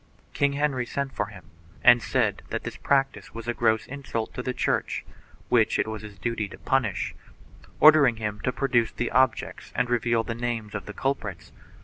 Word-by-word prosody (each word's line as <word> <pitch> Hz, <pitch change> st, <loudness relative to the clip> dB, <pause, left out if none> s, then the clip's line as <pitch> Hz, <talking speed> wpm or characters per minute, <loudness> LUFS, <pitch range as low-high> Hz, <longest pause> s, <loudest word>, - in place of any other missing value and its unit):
King 140 Hz, 0 st, +2 dB
Henry 140 Hz, -4 st, 0 dB
sent 140 Hz, +1 st, -3 dB
for 105 Hz, -, -1 dB
him 95 Hz, -6 st, -14 dB, 0.3 s
and 120 Hz, 0 st, +8 dB
said 110 Hz, -7 st, 0 dB
that -, -, -3 dB
this -, -, -5 dB
practice 135 Hz, -4 st, 0 dB
was 115 Hz, 0 st, -7 dB
a 120 Hz, -, 0 dB
gross 110 Hz, -1 st, +2 dB
insult 130 Hz, -5 st, -4 dB
to 125 Hz, -, -4 dB
the 125 Hz, -, -2 dB
Church, -, -, -1 dB, 0.4 s
which -, -, +3 dB
it -, -, +1 dB
was 110 Hz, -1 st, -5 dB
his 105 Hz, -2 st, -10 dB
duty 110 Hz, +1 st, -2 dB
to -, -, -11 dB
punish, 115 Hz, -9 st, 0 dB, 0.7 s
ordering 150 Hz, -5 st, +7 dB
him 105 Hz, -2 st, -4 dB
to 125 Hz, -, -1 dB
produce 125 Hz, -3 st, +1 dB
the 120 Hz, -, -3 dB
objects 130 Hz, -1 st, +1 dB
and 125 Hz, -1 st, 0 dB
reveal 115 Hz, -1 st, +2 dB
the 115 Hz, -, -4 dB
names 115 Hz, -3 st, -3 dB
of 105 Hz, -, -5 dB
the 105 Hz, -, -6 dB
culprits. 135 Hz, +4 st, -3 dB
120 Hz, 190 wpm, -26 LUFS, 110-130 Hz, 0.7 s, and